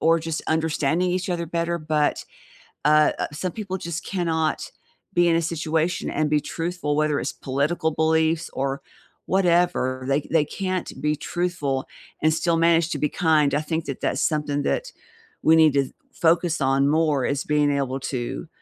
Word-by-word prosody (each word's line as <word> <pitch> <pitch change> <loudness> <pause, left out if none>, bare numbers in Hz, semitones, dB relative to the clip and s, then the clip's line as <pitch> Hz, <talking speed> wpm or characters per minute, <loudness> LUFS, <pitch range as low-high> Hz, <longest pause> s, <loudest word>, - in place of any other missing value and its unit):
or 165 +1 +4
just 165 0 -3
understanding 160 +2 +1
each 185 +1 -2
other 170 -1 -1
better, 170 +1 -1
but, 155 -2 0 0.6
uh, 150 0 +5 0.2
some 180 +4 -3
people 195 -2 -4
just 170 -2 -5
cannot 165 -4 -1 0.4
be 175 0 +4
in 165 - +3
a 165 - +1
situation 165 +1 -1
and 155 0 0
be 150 - +3
truthful, 165 -2 -3
whether 150 -1 +1
it's - - -3
political 145 +5 -1
beliefs 160 +1 +1
or 135 +1 -2 0.4
whatever. 175 -8 +2
They 140 +1 +2
they 160 -2 +3
can't 185 +1 -3
be 150 0 0
truthful 150 -5 -2 0.4
and 155 0 +4
still 170 0 +1
manage 165 0 +3
to 150 - -2
be 150 - +1
kind; 155 -4 +2
I 150 - +2
think 160 +1 -3
that 140 - -5
that's - - 0
something 150 -2 0
that - - -1 0.5
we 160 +1 +5
need 160 -3 +6
to 140 -2 +1 0.2
focus 170 -1 +2
on 135 +1 +2
more 150 -3 +2
is 140 0 -1
being 150 -1 +2
able 135 -1 -1
to 130 +5 -4
160 Hz, 170 wpm, -24 LUFS, 145-170 Hz, 0.6 s, need